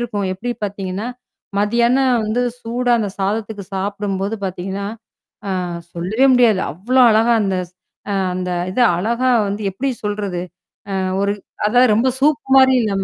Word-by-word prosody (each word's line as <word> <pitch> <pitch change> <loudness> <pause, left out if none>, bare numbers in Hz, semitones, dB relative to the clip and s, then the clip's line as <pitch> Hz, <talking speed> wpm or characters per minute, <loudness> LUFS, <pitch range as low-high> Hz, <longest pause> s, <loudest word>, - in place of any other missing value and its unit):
இருக்கும். 210 -5 -2
எப்படி 240 +6 -4
பாத்தீங்கன்னா? 195 +1 -4 0.5
மதியானம் 235 +4 +2
வந்து 215 +3 0 0.2
சூடா 245 +2 0
அந்த 205 -3 -2
சாதத்துக்கு 205 +1 -2
சாப்பிடும்போது 200 +1 -2
பாத்தீங்கன்னா, 190 +2 -4 0.6
ஆ - - -1 0.4
சொல்லவே 190 +10 +1
முடியாது. 235 -6 +4
அவ்ளோ 240 - +1
அழகா 225 +2 +4
அந்த-அ 185 +1 -5 0.2
அந்த 180 0 -3 0.2
இத 220 - -3 0.2
அழகா 235 +7 +1 0.2
வந்து 200 +2 -3
எப்படி 260 +9 -2 0.2
சொல்றது? 205 -4 -2 0.5
அ - - -2 0.3
ஒரு 200 0 +1 0.4
அதா 245 +4 +4
ரொம்ப 230 +4 +2
சூப் 290 -2 +3 0.2
மாரி 260 0 +6
இல்லாம 200 -3 -1
205 Hz, 135 wpm, -19 LUFS, 195-240 Hz, 0.6 s, மாரி